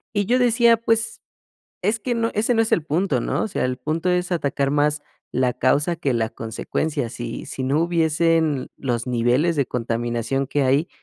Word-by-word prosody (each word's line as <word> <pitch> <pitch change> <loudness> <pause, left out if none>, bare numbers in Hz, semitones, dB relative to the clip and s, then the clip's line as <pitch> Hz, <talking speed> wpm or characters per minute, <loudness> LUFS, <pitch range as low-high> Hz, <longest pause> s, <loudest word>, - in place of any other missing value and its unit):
Y 205 0 +1
yo 245 +5 +2
decía: 235 -1 +4
"Pues 225 0 0 0.6
es 215 +4 +1
que 240 +3 -1
no 230 0 0
ese 225 +4 +2
no 225 - +4
es 225 - -2
el 165 - +3
punto, 155 -3 0
¿no? - - -1
O - - -2
sea, - - -2
el 125 0 -1
punto 155 +7 -1
es 180 0 0
atacar 140 -4 0
más 145 0 +1 0.3
la 125 0 +1
causa 145 +8 +1
que 140 -5 -1
la 115 -1 0
consecuencia". 120 +5 -3
Si 120 0 -6
si 135 - -5
no 135 +4 +1
hubiesen 165 -3 +1
los 120 -3 -2
niveles 125 +7 +1
de 140 -3 +1
contaminación 120 +2 -2
que 145 +1 0
hay, 135 +6 +2
150 Hz, 190 wpm, -22 LUFS, 125-180 Hz, 0.6 s, decía